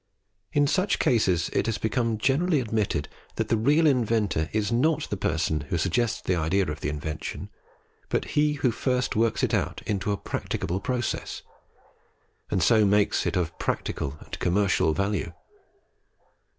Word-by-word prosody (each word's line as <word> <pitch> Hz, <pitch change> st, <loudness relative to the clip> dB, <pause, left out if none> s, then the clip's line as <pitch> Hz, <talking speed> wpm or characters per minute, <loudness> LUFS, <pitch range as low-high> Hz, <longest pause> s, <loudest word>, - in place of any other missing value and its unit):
In 145 Hz, 0 st, +3 dB
such 185 Hz, +7 st, +1 dB
cases 95 Hz, -8 st, +2 dB
it -, -, +1 dB
has 115 Hz, -, 0 dB
become 115 Hz, 0 st, 0 dB
generally 145 Hz, +8 st, +2 dB
admitted 105 Hz, -, -1 dB, 0.3 s
that -, -, -2 dB
the -, -, +3 dB
real 145 Hz, +9 st, +3 dB
inventor 115 Hz, -, +1 dB
is 105 Hz, -1 st, 0 dB
not 150 Hz, +6 st, +2 dB
the -, -, 0 dB
person 80 Hz, -4 st, 0 dB
who 90 Hz, -, 0 dB
suggests 120 Hz, +7 st, 0 dB
the 90 Hz, -, +1 dB
idea 90 Hz, +4 st, +1 dB
of 75 Hz, -, -6 dB
the -, -, -1 dB
invention, 75 Hz, +1 st, -5 dB, 0.6 s
but -, -, 0 dB
he 150 Hz, 0 st, +3 dB
who 140 Hz, -4 st, +1 dB
first 125 Hz, +2 st, -1 dB
works 115 Hz, +1 st, +1 dB
it -, -, +1 dB
out -, -, -1 dB
into 105 Hz, 0 st, -1 dB
a 100 Hz, -, 0 dB
practicable 90 Hz, -1 st, -3 dB
process, 125 Hz, +2 st, -3 dB, 1.1 s
and 90 Hz, -, +1 dB
so 110 Hz, +3 st, +5 dB
makes 105 Hz, 0 st, +2 dB
it -, -, -1 dB
of 85 Hz, -2 st, -1 dB
practical 70 Hz, +1 st, -2 dB
and -, -, -8 dB
commercial 95 Hz, -3 st, +2 dB
value. 100 Hz, +1 st, -1 dB
105 Hz, 155 wpm, -26 LUFS, 90-125 Hz, 1.1 s, so